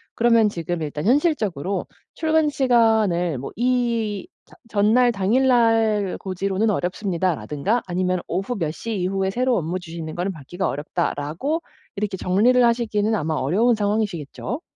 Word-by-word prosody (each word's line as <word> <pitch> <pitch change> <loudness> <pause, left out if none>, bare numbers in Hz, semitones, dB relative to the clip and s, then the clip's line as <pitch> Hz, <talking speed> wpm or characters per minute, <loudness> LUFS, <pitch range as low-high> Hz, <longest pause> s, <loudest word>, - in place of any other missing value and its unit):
그러면 230 -2 +4
지금 170 -2 -4
일단 150 +2 -4
현실적으로 215 - +1 0.3
출근 315 -1 +2
시간을 220 - +2
뭐 135 - -6
이 235 - 0 0.2
저 - - -20 0.2
"전날, 225 +4 +3
당일 225 +6 +2
날 225 -5 +3
고지로는 195 +3 -1
어렵습니다."라든가 185 +1 -1
아니면 185 0 0
"오후 195 +8 -2
몇 160 -4 -1
시 225 +7 -5
이후에 190 +1 -1
새로 250 +2 +1
업무 175 +2 -2
주시는 165 -2 -7
거는 180 +3 -2
받기가 175 +5 -4
어렵다."라고 165 - -2 0.3
이렇게 200 -1 -2
정리를 225 +8 +3
하시기는 225 -2 +1
아마 160 -4 -1
어려운 195 - +2
상황이시겠죠? 210 - -2
205 Hz, 345 characters per minute, -22 LUFS, 175-235 Hz, 0.3 s, 그러면